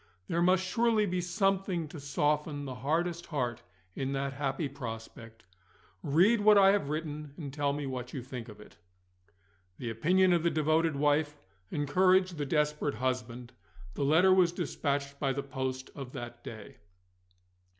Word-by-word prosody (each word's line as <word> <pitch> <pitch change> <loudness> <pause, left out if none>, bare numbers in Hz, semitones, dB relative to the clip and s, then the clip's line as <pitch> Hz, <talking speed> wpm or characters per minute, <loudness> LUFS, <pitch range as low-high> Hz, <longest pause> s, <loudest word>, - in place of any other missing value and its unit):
There 170 - 0
must 185 +1 +3
surely 225 +2 +2
be 180 -2 -1
something 190 -2 0
to 155 - -8
soften 145 +1 -1
the 130 - -5
hardest 165 +7 -1
heart 125 -7 -2 0.3
in 135 0 -2
that 135 0 -2
happy 140 +1 -2
prospect. 115 -3 -8 0.6
Read 190 +10 +3
what 210 0 +6
I 195 -1 +7
have 200 -8 0
written, 150 -2 -4
and 140 -5 -7
tell 145 -1 0
me 145 0 -3
what 125 -2 -5
you 130 - -5
think 125 -2 -7
of 105 - -12
it." 105 - -15 1.0
The 120 -2 -4
opinion 180 +10 +3
of 170 - +3
the 170 - +2
devoted 155 0 +1
wife 150 +1 +1 0.3
encouraged 185 +4 +2
the 145 - -2
desperate 150 -1 0
husband: 125 -1 -3 0.4
the 140 - -2
letter 165 +7 +5
was 180 -2 +4
dispatched 140 -5 -2
by 135 -2 0
the 140 +1 -3
post 130 -1 -4
of 135 -3 -8
that 120 -2 -8
day. 110 -3 -9
145 Hz, 160 wpm, -30 LUFS, 130-175 Hz, 1.0 s, I